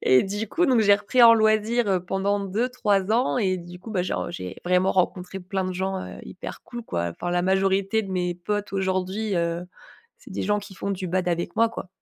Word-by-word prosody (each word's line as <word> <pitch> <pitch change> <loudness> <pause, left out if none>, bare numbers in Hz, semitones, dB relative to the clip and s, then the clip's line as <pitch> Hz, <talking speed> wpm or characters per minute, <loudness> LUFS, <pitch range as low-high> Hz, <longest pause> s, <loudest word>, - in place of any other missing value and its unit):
Et 130 0 +5
du 205 +3 -3
coup, 350 - +1
donc 255 -6 +4
j'ai 205 -2 +6
repris 205 +5 +2
en 230 -1 +10
loisir, 220 +1 +2
heu, 190 -2 +2
pendant 195 +2 0
2-3 205 -1 0
ans 245 +4 +2
et 190 -6 +1
du 175 +1 -10
coup, 220 - -9
bah, 190 -4 0
genre, 180 - -2
j'ai 90 - -6
vraiment 180 +1 +3
rencontré 185 0 -1
plein 190 +1 -3
de 185 - -2
gens, 190 +1 -2
heu, - - -8
hyper - - -8
cool, 240 -1 -8
quoi. 85 - -2
Enfin 175 - -5
la 175 0 +1
majorité 195 +2 +2
de 195 - -7
mes 180 -1 -1
potes 205 +4 -3
aujourd'hui, 190 +2 -1
heu, 170 +1 -1 0.5
c'est - - -15
des - - -3
gens 210 0 +1
qui 200 -1 -11
font 200 - -4
du 185 -1 -4
bad 180 0 0
avec 170 0 -2
moi, 230 0 +4
quoi. 225 - -7
195 Hz, 225 wpm, -25 LUFS, 180-215 Hz, 0.5 s, en